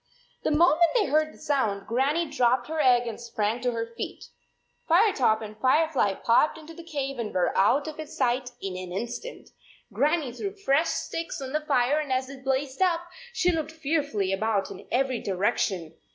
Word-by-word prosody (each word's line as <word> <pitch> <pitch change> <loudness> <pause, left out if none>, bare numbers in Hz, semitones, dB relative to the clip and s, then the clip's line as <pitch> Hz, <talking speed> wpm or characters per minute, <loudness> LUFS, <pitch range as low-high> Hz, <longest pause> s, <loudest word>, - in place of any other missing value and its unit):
The - - 0
moment 335 +2 +4
they 440 -4 +4
heard 310 -1 +2
the - - -17
sound, 220 -9 -1
Gran 265 +6 +1
nie 340 0 +1
dropped 250 -4 +1
her 320 0 -2
egg 245 -3 +4
and 230 0 -6
sprang 230 0 -2
to 250 - +1
her 230 -1 -2
feet. - - -6 0.6
Firetop 320 - +4
and 215 0 -8
Firefly 265 -6 +2
popped 240 +11 +3
into 320 +1 -11
the 340 - -11
cave 275 -5 -4
and 220 -3 -3
were 180 -1 0
out 260 +10 +3
of 310 -1 -7
sight 250 +1 0
in 195 -2 -5
an 185 -1 -6
instant. 235 - -6 0.4
Gran 300 +10 +2
nie 265 -5 -5
threw 395 - -5
fresh 320 -5 +2
sticks 330 -1 -3
on 265 0 -6
the 305 - +1
fire, 280 -1 +2
and 295 -3 -4
as 260 +1 0
it 270 -1 -11
blazed 270 +2 -1
up, 350 -3 +3 0.3
she 360 -6 +2
looked 315 -2 -2
fearfully 285 - -1
about 205 0 0
in - - -10
every 260 -1 +1
direction. 185 -3 -1
270 Hz, 190 wpm, -26 LUFS, 230-310 Hz, 0.6 s, moment